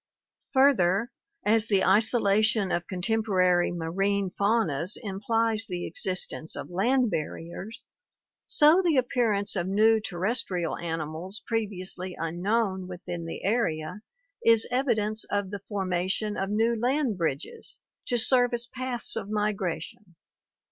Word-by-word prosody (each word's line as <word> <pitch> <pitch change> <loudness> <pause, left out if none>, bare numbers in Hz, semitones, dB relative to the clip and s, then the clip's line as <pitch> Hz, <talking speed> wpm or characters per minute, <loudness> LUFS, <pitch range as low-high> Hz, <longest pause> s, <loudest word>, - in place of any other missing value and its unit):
Further, 235 -5 +4 0.3
as 225 +1 +3
the 195 -3 +3
isolation 215 0 +3
of 175 0 -1
contemporary 185 -2 +1
marine 190 +3 -1
faunas 200 -5 +1
implies 225 +2 0
the 180 -2 -4
existence 180 -2 -2
of - - -7
land 240 +6 +2
barriers, 170 +8 -5 0.6
so 310 +5 +5
the 335 -6 +2
appearance 230 -6 +1
of 180 -2 -1
new 220 +3 +4
terrestrial 185 -3 -1
animals 165 +4 -4
previously 190 -5 -3
unknown 190 +3 -1
within 175 -2 -6
the 165 - -6
area 185 -4 -1 0.4
is 230 -1 +5
evidence 220 -4 0
of 200 -2 -2
the 205 - -4
formation 190 +1 -1
of 195 0 -2
new 225 +3 +2
land 250 +1 0
bridges 165 - -3 0.3
to 245 - +1
serve 245 +1 +3
as 235 0 -4
paths 255 -1 -4
of 200 - -4
migration. 210 -2 -3
205 Hz, 120 wpm, -27 LUFS, 180-230 Hz, 0.6 s, so